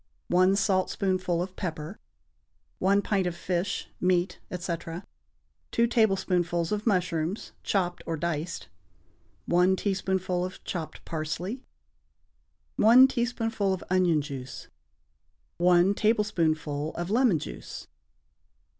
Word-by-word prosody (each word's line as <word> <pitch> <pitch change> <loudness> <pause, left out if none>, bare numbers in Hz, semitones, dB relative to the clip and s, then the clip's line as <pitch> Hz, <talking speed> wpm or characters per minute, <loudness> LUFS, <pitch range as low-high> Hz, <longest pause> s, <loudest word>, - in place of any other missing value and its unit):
1 185 +2 +4
saltspoonful 185 -2 +1
of 185 0 -8
pepper. 160 0 -5 0.8
1 200 +2 +3
pint 195 -3 +1
of 175 - -3
fish, 180 +2 -2
meat, 180 0 +1
etc. 175 -2 -5 0.7
2 235 - +4
tablespoonfuls 185 -7 +1
of 210 +2 -2
mushrooms, 180 -2 0
chopped 180 -3 -1
or 165 -1 -2
diced. 170 +1 -3 0.8
1 180 +2 +3
teaspoonful 190 -2 -1
of 185 +1 -6
chopped 165 -4 -6
parsley. 170 - -4 1.2
1 240 +5 +8
teaspoonful 225 -5 0
of 180 - -10
onion 175 -5 +3
juice. 135 -3 -8 0.9
1 175 +2 +4
tablespoonful 160 -9 0
of 175 +2 -4
lemon 235 -6 +4
juice. - - -8
180 Hz, 100 wpm, -27 LUFS, 170-200 Hz, 1.2 s, 1